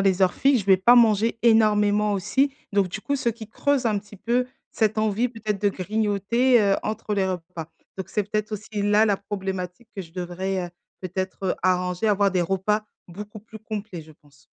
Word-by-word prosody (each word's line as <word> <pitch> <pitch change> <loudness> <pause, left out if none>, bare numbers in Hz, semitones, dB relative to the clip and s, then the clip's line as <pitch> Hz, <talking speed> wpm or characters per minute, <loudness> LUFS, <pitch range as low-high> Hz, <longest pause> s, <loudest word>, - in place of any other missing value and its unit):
les 195 -1 +2
heures 180 - +4
fixes, 270 -3 +3
je - - -7
vais 190 -1 +6
pas 235 +7 +5
manger 225 -1 +4
énormément 210 -2 +3
aussi, 235 +9 +1 0.2
donc 200 -2 +2
du 215 - -6
coup, 280 +6 -1
ce 260 - -1
qui 225 -1 -5
creuse 275 +2 0
un 215 -3 +1
petit 205 0 -13
peu 240 +5 0 0.2
cette 220 -1 0
envie 215 +3 +1
peut-être 215 -4 -4
de 205 -1 +2
grignoter, 215 +5 +1
heu, 200 -1 +3
entre 215 -1 -3
les 195 -2 +1
repas, 180 -3 -5 0.3
donc 190 - -6
c'est 210 - 0
peut-être 215 0 -2
aussi 210 0 -5
là 210 +2 +4
la 205 - +2
problématique 190 +1 -5
que - - -3
je 165 -2 -16
devrais, 185 +1 -3
heu, 175 - -12 0.3
peut-être, 185 +1 -5
heu, - - +1
arranger, 180 +2 +1
avoir 200 -1 +3
des 180 -1 +1
repas 195 +4 0 0.2
beaucoup 210 +4 -9
plus 220 +1 -12
complets, 210 -5 -6
je 155 0 -16
pense. 145 -1 -25
205 Hz, 200 wpm, -24 LUFS, 190-220 Hz, 0.3 s, vais